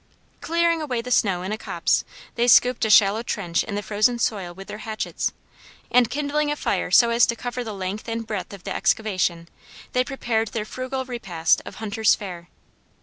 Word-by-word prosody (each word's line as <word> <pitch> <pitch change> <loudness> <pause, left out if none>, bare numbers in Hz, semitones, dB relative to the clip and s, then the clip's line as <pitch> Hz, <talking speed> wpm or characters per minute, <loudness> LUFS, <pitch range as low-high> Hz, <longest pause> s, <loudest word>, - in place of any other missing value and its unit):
Clearing 335 0 +1
away 250 -6 -2
the 250 - -6
snow 190 -7 +2
in 190 - -4
a 215 - -3
copse, - - 0 0.3
they 240 0 +1
scooped 245 +1 +5
a - - 0
shallow 210 +1 +5
trench 180 -7 -1
in 205 - -5
the 205 - -3
frozen 215 +4 +2
soil 200 -6 -1
with 195 +2 -11
their 210 - -7
hatchets, 220 0 -3 0.6
and 245 -2 +4
kindling 295 +2 -1
a - - 0
fire - - -1
so 235 -1 +6
as 235 +1 +5
to 235 - 0
cover 245 +1 -4
the 225 - -5
length 195 +3 -5
and 230 0 -3
breadth 205 -5 -4
of 200 -2 -10
the - - -4
excavation, 185 -4 0 0.5
they 250 - +3
prepared 240 -4 -1
their 210 0 -4
frugal 260 +3 -4
repast 185 -10 0
of - - -8
hunters' 220 0 +2
fare. 175 -4 -8
220 Hz, 195 wpm, -23 LUFS, 195-245 Hz, 0.6 s, so